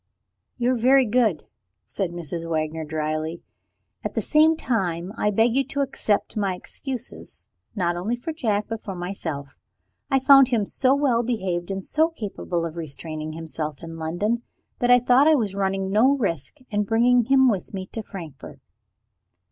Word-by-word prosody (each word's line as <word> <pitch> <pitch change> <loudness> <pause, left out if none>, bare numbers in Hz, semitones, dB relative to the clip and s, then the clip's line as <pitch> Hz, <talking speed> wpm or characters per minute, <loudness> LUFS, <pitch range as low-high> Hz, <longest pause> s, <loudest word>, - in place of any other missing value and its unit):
"You 245 0 +1
are - - +2
very 260 +3 +5
good," 215 -8 +1 0.4
said 195 -3 -3
Mrs. 170 -1 -5
Wagner 160 0 -1
dryly. 155 +1 -3 0.6
"At - - -4
the - - +1
same 315 +1 +4
time, 185 - -1
I 210 - +1
beg 225 +3 +3
you 275 +2 +3
to 280 0 -2
accept 260 -6 -1
my 200 -3 0
excuses 255 +6 -7 0.3
not 175 -4 0
only 195 +7 -1
for 245 +7 -5
Jack, 215 -9 0
but 225 -1 -5
for 195 - -5
myself. 165 -6 -5 0.5
I 270 - +3
found 270 0 +7
him 235 -5 +1
so 260 +6 +2
well 270 -5 +2
behaved, 190 -7 -2
and 195 -1 -4
so 315 +1 +2
capable 195 - -4
of 165 0 -6
restraining 155 0 -5
himself 155 -2 -5
in 165 0 -7
London, 175 +9 -1 0.4
that 245 - +1
I 245 - +8
thought 250 +4 +4
I 315 - +6
was 215 -8 0
running 195 -1 -1
no 255 +7 +4
risk 170 - -2
in 205 0 +1
bringing 235 +3 +3
him 265 +1 +5
with 205 -7 0
me 190 -2 -5
to 225 - -3
Frankfort." 165 -9 -10
205 Hz, 170 wpm, -24 LUFS, 170-245 Hz, 0.6 s, I